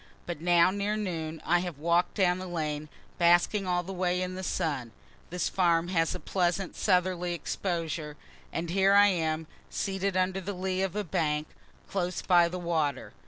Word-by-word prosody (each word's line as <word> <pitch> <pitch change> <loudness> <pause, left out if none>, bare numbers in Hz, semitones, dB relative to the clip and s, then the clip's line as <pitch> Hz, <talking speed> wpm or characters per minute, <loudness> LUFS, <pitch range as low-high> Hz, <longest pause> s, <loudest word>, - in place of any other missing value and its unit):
But 170 -3 -5
now, 175 +1 +5
near 205 +2 -1
noon, 165 -6 -4
I 175 +1 +3
have 175 -4 -4
walk'd 170 +3 +1
down 185 -3 +2
the 185 - -6
lane, 155 -3 -3 0.3
basking 175 +3 +4
all 175 -1 +1
the 190 +2 -6
way 180 -1 0
in 185 0 -2
the 185 - -5
sun 145 -11 -2 0.4
(this 180 -1 -1
farm 170 -2 +2
has 165 -2 +1
a - - -5
pleasant 180 0 -1
southerly 180 -1 +1
exposure,) 165 -3 -3 0.3
and 165 0 -3
here 195 +1 +4
I 205 0 +7
am, 160 -3 -1 0.2
seated 195 -1 -1
under 185 +1 +1
the 200 +2 -4
lee 185 0 -2
of 195 -1 -1
a 210 - -1
bank, 150 -3 -1 0.4
close 180 -2 -2
by 175 -2 +5
the 180 - -4
water. 160 -6 -1
175 Hz, 175 wpm, -29 LUFS, 165-185 Hz, 0.4 s, I